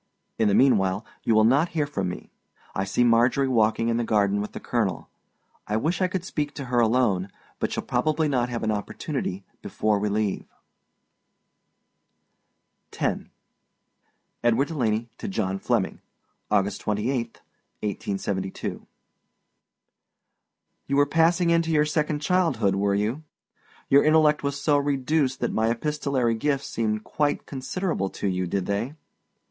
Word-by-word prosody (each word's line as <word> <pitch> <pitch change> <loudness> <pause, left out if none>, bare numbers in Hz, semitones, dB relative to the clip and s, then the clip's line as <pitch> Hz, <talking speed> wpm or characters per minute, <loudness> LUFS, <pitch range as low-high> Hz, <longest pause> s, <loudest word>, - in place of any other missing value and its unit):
In 110 - +3
the 100 - +3
meanwhile 105 -5 +3 0.2
you 115 - +2
will 110 - +5
not 140 +9 +4
hear 150 - +2
from 100 -11 -3
me. 90 - -8 0.4
I 95 - -1
see 100 +5 +1
Marjorie 120 +3 +3
walking 115 -2 +2
in 115 0 +1
the 120 - 0
garden 100 -2 +2
with 105 - -6
the - - -6
colonel. 110 -7 -2 0.6
I 105 - 0
wish 165 +10 -1
I 185 - +4
could 185 -1 -4
speak 150 -4 -3
to 140 - -5
her 120 - +4
alone, 110 -5 +2 0.3
but - - -1
shall - - -2
probably 155 +5 +1
not 125 -4 0
have 120 -2 -4
an 110 - +1
opportunity 105 - -3 0.2
before 105 -1 0
we 105 +1 0
leave. 105 -1 -1 2.4
X. - - -2 1.2
EDWARD 120 +4 +3
DELANEY 115 -6 -1
TO - - -5
JOHN 95 - -2
FLEMMING. 110 -3 -1 0.5
August 100 +1 +1
28, 115 +3 -2 0.4
1872. 95 -2 -3 2.0
You 140 - 0
were 145 0 +5
passing 170 +3 +3
into 165 -1 +2
your 150 -2 +3
second 150 -1 -1
childhood, 150 - +2
were 100 +1 +1
you? 110 +8 -1 0.7
Your 140 +1 +5
intellect 155 -1 +4
was 140 0 -2
so 145 -1 +3
reduced 140 -1 0
that - - -1
my 110 +1 +2
epistolary 135 -1 0
gifts 140 +4 -1
seemed 110 -1 -2
quite 145 -1 -1
considerable 140 - -2
to 100 - -4
you, 90 -1 -1
did 95 +1 -1
they? 110 +8 -2
120 Hz, 145 wpm, -25 LUFS, 105-145 Hz, 2.4 s, will